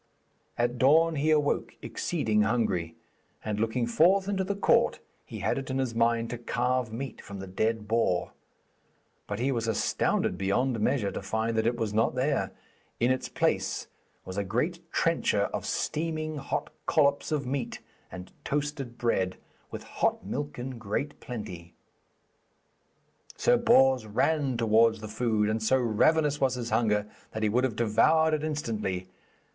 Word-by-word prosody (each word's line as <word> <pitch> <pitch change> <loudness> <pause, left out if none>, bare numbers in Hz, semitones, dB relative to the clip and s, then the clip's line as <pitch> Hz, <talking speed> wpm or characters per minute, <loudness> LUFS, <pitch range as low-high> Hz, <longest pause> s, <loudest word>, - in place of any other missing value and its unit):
At 120 0 +2
the 125 - -9
dawn 160 +5 +5
he 150 +2 +1
awoke, 150 -2 +1
exceeding 110 -11 0
hungry, 105 -7 0 0.5
and 105 -1 -2
looking 115 +2 0
forth 180 +11 +3
into 195 -2 0
the 200 +2 -2
court 200 - +3 0.3
he - - -8
had - - +1
it 135 - -7
in 130 - -1
his 130 -3 -1
mind 115 0 +1
to 120 - -5
carve 125 0 -1
meat 125 +2 -6
from 100 - -9
the 95 - -6
dead 110 +3 -1
boar. 110 -5 +1 1.0
But 100 - -3
he 130 +4 0
was 115 -3 -1
astounded 110 - 0
beyond 115 +5 +1
measure 105 -2 +1
to - - -5
find 110 +4 -1
that 110 0 +2
it 120 - +1
was 110 -3 -2
not 110 +3 +2
there. 135 +3 0 0.5
In 120 +2 +3
its 130 - -1
place - - 0 0.4
was 95 +1 -7
a 100 - +1
great 140 - -1
trencher 165 -11 +1
of - - -3
steaming 155 -1 -2
hot 135 - -3 0.2
collops 140 -2 +2
of 145 -3 0
meat, 135 0 -3 0.3
and 90 0 -9
toasted 145 -4 -3
bread, 95 -6 0 0.3
with - - -7
hot - - -1
milk 145 +2 -4
in 125 0 -6
great 110 +7 -3
plenty. 90 -8 -8 1.6
Sir - - +4
Bors 130 -4 +4
ran 135 +4 +1
towards 115 0 +4
the 110 - -7
food, 110 -1 0
and 110 +1 -1
so 110 +4 +3
ravenous 145 +6 +2
was 130 -1 +2
his 120 -1 -4
hunger 105 -3 +2 0.3
that 110 - -3
he 105 - +3
would 125 +4 +2
have 120 -5 -2
devoured 155 +9 +3
it 155 -1 0
instantly. 110 -12 -2
120 Hz, 160 wpm, -28 LUFS, 110-140 Hz, 1.6 s, dawn